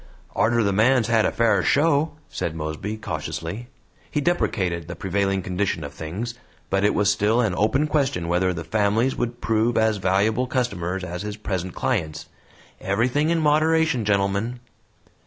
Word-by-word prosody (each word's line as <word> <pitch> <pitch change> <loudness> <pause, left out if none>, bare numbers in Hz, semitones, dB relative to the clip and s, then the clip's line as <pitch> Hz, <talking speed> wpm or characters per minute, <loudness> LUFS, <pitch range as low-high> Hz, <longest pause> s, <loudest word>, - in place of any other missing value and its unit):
"Arter 120 +1 +2
the 100 -1 +1
man's 115 +2 +3
had 115 -2 +3
a - - -1
fair 110 -4 +2
show," 150 - +2
said 80 - -4
Mosby, 80 +7 -4
cautiously. 105 +1 -5 0.4
He - - -1
deprecated 95 - 0
the - - -6
prevailing 95 0 -1
condition 90 -2 -1
of 70 0 -7
things, 95 +11 -5 0.4
but 100 +1 +1
it 105 - +3
was 105 - +3
still 110 +4 +2
an 110 -6 +1
open 120 +10 +2
question 140 - 0
whether 90 +2 +1
the 85 -2 -5
families 110 +7 +1
would 120 0 -3
prove 115 +1 +1
as 110 -1 +2
valuable 105 +6 +1
customers 95 -8 -2
as 90 0 -5
his 105 0 -5
present 95 -3 -4
clients. 75 -1 -2 0.5
"Everything 125 +10 +1
in 170 0 +2
moderation, 155 -3 +2
gentlemen." 100 +4 0
105 Hz, 155 wpm, -23 LUFS, 95-120 Hz, 0.5 s, man's